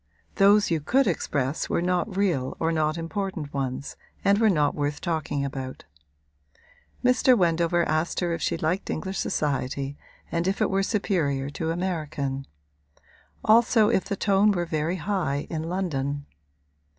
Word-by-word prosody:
Those 205 Hz, 0 st, +5 dB
you 160 Hz, -2 st, +1 dB
could 265 Hz, -, +3 dB
express 145 Hz, -6 st, -1 dB
were -, -, +1 dB
not 180 Hz, +3 st, -1 dB
real 165 Hz, -11 st, 0 dB
or 165 Hz, 0 st, +1 dB
not 155 Hz, 0 st, 0 dB
important 170 Hz, -3 st, -4 dB
ones 135 Hz, 0 st, -3 dB, 0.3 s
and 200 Hz, +1 st, +4 dB
were 225 Hz, -1 st, +5 dB
not 150 Hz, -6 st, +2 dB
worth 145 Hz, 0 st, -2 dB
talking 155 Hz, -5 st, -2 dB
about. 130 Hz, -1 st, -6 dB, 1.2 s
Mr. 250 Hz, 0 st, +5 dB
Wendover 170 Hz, -1 st, +2 dB
asked 155 Hz, +2 st, 0 dB
her 175 Hz, -2 st, 0 dB
if 165 Hz, -, -4 dB
she -, -, 0 dB
liked 165 Hz, +5 st, -1 dB
English 190 Hz, +4 st, -3 dB
society 140 Hz, -1 st, -2 dB, 0.3 s
and 170 Hz, +1 st, 0 dB
if 195 Hz, -, 0 dB
it 215 Hz, -, +1 dB
were 195 Hz, 0 st, +2 dB
superior 160 Hz, -10 st, 0 dB
to 160 Hz, +2 st, -3 dB
American; 155 Hz, -6 st, -2 dB, 1.0 s
also 225 Hz, -1 st, +5 dB
if 190 Hz, -, +1 dB
the 200 Hz, -, -2 dB
tone 200 Hz, +1 st, +3 dB
were 175 Hz, -3 st, 0 dB
very 160 Hz, +1 st, -1 dB
high 180 Hz, -8 st, -1 dB
in 160 Hz, 0 st, -3 dB
London. 145 Hz, -6 st, -2 dB
165 Hz, 150 wpm, -26 LUFS, 145-195 Hz, 1.2 s, Those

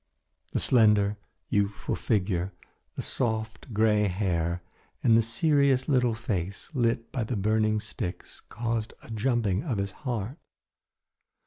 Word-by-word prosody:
The -, -, -1 dB
slender, 105 Hz, -4 st, +4 dB, 0.3 s
youthful 100 Hz, 0 st, 0 dB
figure, 95 Hz, -3 st, 0 dB, 0.4 s
the -, -, -4 dB
soft 110 Hz, -1 st, -3 dB
grey 105 Hz, -1 st, +3 dB
hair 90 Hz, -3 st, -1 dB, 0.4 s
and 115 Hz, -, +6 dB
the 115 Hz, -, +6 dB
serious 135 Hz, +2 st, +2 dB
little 125 Hz, -5 st, +3 dB
face, 100 Hz, -, -3 dB
lit 115 Hz, -3 st, 0 dB
by 125 Hz, -, -1 dB
the 110 Hz, +1 st, -2 dB
burning 110 Hz, +1 st, +2 dB
sticks 105 Hz, -4 st, -6 dB
caused 115 Hz, -1 st, -3 dB
a -, -, -11 dB
jumping 110 Hz, -3 st, +1 dB
of 130 Hz, -10 st, -2 dB
his 100 Hz, 0 st, -1 dB
heart. 120 Hz, -, -4 dB
110 Hz, 125 wpm, -28 LUFS, 100-120 Hz, 0.4 s, and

